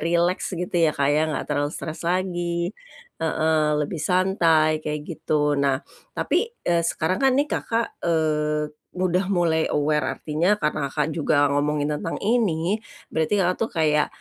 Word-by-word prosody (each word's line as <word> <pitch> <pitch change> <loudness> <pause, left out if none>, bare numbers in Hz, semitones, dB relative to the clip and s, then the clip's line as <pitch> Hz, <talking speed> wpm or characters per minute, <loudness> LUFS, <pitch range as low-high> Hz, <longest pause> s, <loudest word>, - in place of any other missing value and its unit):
rileks 170 +3 0
gitu 180 +1 -4
ya 165 -3 +2
Kak 140 0 +2
ya, 155 +1 +2
nggak 150 - -2
terlalu 145 0 -1
stress 155 0 -6
lagi 175 -1 -1 0.5
heeh, 160 -1 +1
lebih 150 +2 -3
santai 165 -3 +3
kayak 150 -1 -3
gitu. 150 -2 0
Nah, 140 -1 +2 0.4
tapi, 425 +7 +1 0.2
eee, 170 -1 +2
sekarang 170 - -1
kan 265 -1 +4
nih 285 +1 +2
Kakak, 230 0 -2
eee, 150 -2 0 0.2
udah 185 0 +1
mulai 170 -4 +2
aware, 150 +1 +1
artinya 165 +6 +1
karena 150 -6 -1
Kakak, 150 +2 -1
juga 145 -2 +2
ngomongin 145 +1 0
tentang 165 - -4
ini, 200 -4 +1 0.3
berarti 160 +5 0
Kakak 180 +1 +1
tuh 225 - -1
kayak, 150 -2 +2
160 Hz, 150 wpm, -24 LUFS, 150-180 Hz, 0.5 s, kan